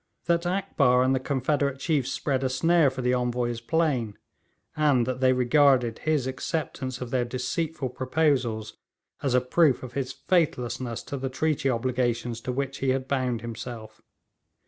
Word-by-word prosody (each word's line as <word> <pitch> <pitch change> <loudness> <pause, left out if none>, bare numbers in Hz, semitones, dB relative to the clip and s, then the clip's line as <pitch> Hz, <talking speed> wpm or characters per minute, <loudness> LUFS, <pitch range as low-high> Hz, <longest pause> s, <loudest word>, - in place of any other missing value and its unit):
That 170 +1 +1
Akbar 150 -10 +2
and 130 +1 +2
the 130 - +1
confederate 140 +1 0
chiefs 135 -3 0
spread 135 -2 -1
a 130 - +1
snare 165 +3 +3
for 130 -1 -6
the 125 0 +2
Envoy 125 -1 0
is 115 -1 -6
plain, 130 -7 0 0.6
and 145 -6 +3
that 130 +1 -3
they 130 0 +4
regarded 125 -2 +3
his 155 -4 0
acceptance 130 -1 -3
of 125 -1 -5
their 125 -2 +1
deceitful 130 +4 -3
proposals 125 -5 0 0.4
as 135 -3 +1
a 125 - +4
proof 135 +2 +2
of 125 -1 -8
his 130 0 -2
faithlessness 125 - -1
to 140 - -5
the 135 0 -3
treaty 145 0 0
obligations 120 -1 -1
to 125 - -3
which 135 +1 -3
he 135 - 0
had 130 0 0
bound 130 -4 -1
himself. 115 -1 -8
130 Hz, 165 wpm, -26 LUFS, 125-140 Hz, 0.6 s, they